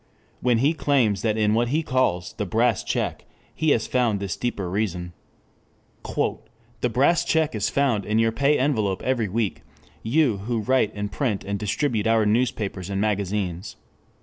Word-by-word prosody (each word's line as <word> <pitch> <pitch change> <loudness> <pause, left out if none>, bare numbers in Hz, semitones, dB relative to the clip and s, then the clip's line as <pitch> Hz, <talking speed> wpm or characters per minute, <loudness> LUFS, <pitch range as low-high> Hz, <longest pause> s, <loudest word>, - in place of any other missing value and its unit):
_] - - -37 0.4
when 125 -2 +3
he 140 +7 +3
claims 125 - +1
that 110 0 0
in 105 -1 +2
what 120 +2 +2
he 155 +6 0
calls 130 - 0
"The 105 - -3
Brass 115 +3 +1
Check" - - -2 0.3
he 160 - 0
has 115 -5 +2
found 120 -5 +1
this 100 -1 -3
deeper 105 -6 -3
reason: 90 -2 -2 0.9
"The 115 +1 -4
Brass 140 +8 +3
Check 160 -2 +1
is 105 -2 -1
found 130 -7 +1
in 105 +1 -1
your 115 0 +3
pay 140 +5 +2
envelope 110 -9 0
every 120 -5 0
week 110 0 -1 0.4
you 125 -2 +2
who 110 +3 -2
write 130 -1 +2
and 105 0 -4
print 115 -7 -1
and 100 0 -3
distribute 110 +1 0
our 115 -1 +3
newspapers 105 -4 -1
and 100 -1 -2
magazines. 100 -2 -2
110 Hz, 170 wpm, -24 LUFS, 100-125 Hz, 0.9 s, when